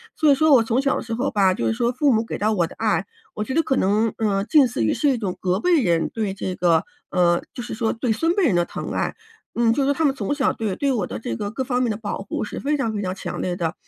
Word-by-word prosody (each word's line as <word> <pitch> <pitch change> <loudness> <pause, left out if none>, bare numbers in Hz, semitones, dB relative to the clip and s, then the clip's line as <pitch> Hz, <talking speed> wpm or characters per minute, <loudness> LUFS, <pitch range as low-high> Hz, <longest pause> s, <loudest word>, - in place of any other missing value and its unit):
所 310 -3 +4
以 - - +7
说 315 +1 +4
我 245 -4 +6
从 230 +3 +1
小 275 0 +1
的 - - -2
时 230 -2 -5
候 245 +4 -1
吧， 195 -3 +3
就 115 -10 -2
是 110 - +1
说 235 - 0
父 270 +2 +2
母 220 0 +2
给 225 - -5
到 215 +1 +1
我 180 -5 +2
的 - - -10
爱， 210 -5 +1 0.3
我 210 - -3
觉 260 - -4
得 325 - +3
可 270 - 0
能， 210 +1 +1
嗯， 200 -3 0
近 300 -4 +6
似 115 - -1
于 110 - +2
是 295 - +1
一 265 - +1
种 200 -5 -3
隔 185 +1 +1
辈 340 +4 +3
人 170 -6 +1
对 215 -4 -3
这 190 -1 -4
个 170 -3 +2 0.2
呃， 175 -1 +2
就 - - -6
是 240 - -6
说 220 0 0
对 235 0 -1
孙 330 +10 +1
辈 395 - +2
人 210 - +2
的 175 - +3
疼 - - -6
爱， - - -1 0.4
嗯， 235 -1 +2
就 275 - +1
是 - - 0
说 285 - +3
他 315 +3 0
们 275 -2 +2
从 215 +2 -2
小 280 -3 +1
对 210 -4 -3
对 280 -1 +1
我 215 -7 -1
的 105 - -6
这 115 +1 -4
个 205 - -4
各 260 +4 -3
方 250 0 0
面 240 - +1
的 210 - -3
保 210 -2 -4
护 195 - -4
是 - - -6
非 295 +2 0
常 230 -5 -1
非 205 - -2
常 185 -2 -2
强 - - -5
烈 180 -1 -2
的。 170 -3 -2
220 Hz, 335 characters per minute, -22 LUFS, 190-265 Hz, 0.4 s, 以